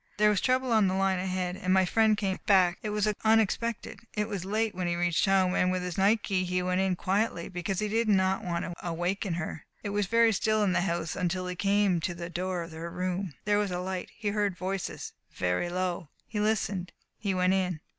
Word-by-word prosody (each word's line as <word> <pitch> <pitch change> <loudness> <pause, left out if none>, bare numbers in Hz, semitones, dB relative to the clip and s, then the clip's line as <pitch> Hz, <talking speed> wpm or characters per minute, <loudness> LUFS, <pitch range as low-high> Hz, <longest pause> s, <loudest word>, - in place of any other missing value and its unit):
There 210 0 +5
was 205 - +1
trouble 255 0 +1
on 215 -3 +4
the 185 - 0
line 190 -1 +1
ahead, 185 -1 -2
and 185 0 -2
my 190 0 +5
friend 220 +2 +3
came 195 -3 -1
back. 185 -3 +4
It 215 - -3
was 210 0 0 0.2
unexpected. 225 +1 +1 0.2
It 210 0 0
was 200 -5 -4
late 215 +2 0
when 180 -1 -2
he 175 - 0
reached 175 -1 +1
home, 190 -2 +3
and 185 -1 +2
with 185 0 -1
his 180 -1 -4
night 205 +3 +3
key 190 -2 0
he 180 0 -1
went 180 +1 +1
in 190 -1 +1
quietly, 190 -1 -1
because 185 +1 -3
he 210 - 0
did 225 +1 0
not 190 -1 +2
want 170 -1 -2
to 175 - -5
awaken 175 +2 -2
her. 160 -2 -5 0.2
It 205 - -3
was 205 -1 0
very 230 +1 +4
still 215 +1 +1
in 190 -3 +2
the - - +2
house 170 -3 -2
until 185 0 -1
he 180 0 -4
came 200 -1 +2
to 175 +2 -3
the 170 0 -6
door 180 0 -2
of 165 - -10
her 165 +1 -6
room. 180 -2 -3
There 205 0 +3
was 205 -1 0
a 180 - -2
light. 185 0 -4
He 210 -2 -2
heard 205 -3 0
voices 190 0 -4 0.2
very 90 - 0
low. 180 -3 -2 0.2
He 210 - -4
listened. 205 -4 -1 0.3
He 195 -3 -1
went 185 0 +3
in." 180 -4 0
190 Hz, 230 wpm, -29 LUFS, 180-205 Hz, 0.3 s, There